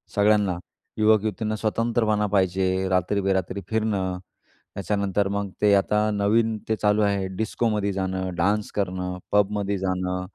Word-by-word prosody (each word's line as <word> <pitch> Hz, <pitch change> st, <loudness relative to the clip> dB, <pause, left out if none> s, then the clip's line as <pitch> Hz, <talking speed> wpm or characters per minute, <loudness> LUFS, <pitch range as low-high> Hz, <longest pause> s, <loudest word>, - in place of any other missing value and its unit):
सगळ्यांना 105 Hz, -3 st, +3 dB, 0.4 s
युवक-युवतींना 110 Hz, -1 st, +2 dB
स्वतंत्रपणा 110 Hz, -1 st, 0 dB
पाहिजे, 95 Hz, -1 st, +1 dB
रात्री-बेरात्री 95 Hz, 0 st, 0 dB
फिरणं, 100 Hz, -5 st, -1 dB, 0.6 s
त्याच्यानंतर 100 Hz, 0 st, -1 dB
मग 100 Hz, 0 st, -2 dB
ते 105 Hz, -1 st, +5 dB
आता 105 Hz, +2 st, +2 dB
नवीन, 110 Hz, +2 st, +1 dB
ते 110 Hz, -, +1 dB
चालू 105 Hz, 0 st, +2 dB
आहे 100 Hz, -2 st, +1 dB
डिस्कोमध्ये 105 Hz, -1 st, -1 dB
जाणं, 95 Hz, -1 st, -2 dB
डान्स 100 Hz, +4 st, +1 dB
करणं, 90 Hz, -2 st, -2 dB
पबमध्ये 100 Hz, -1 st, +1 dB
जाणं, 90 Hz, -1 st, -2 dB
100 Hz, 115 wpm, -24 LUFS, 95-105 Hz, 0.6 s, ते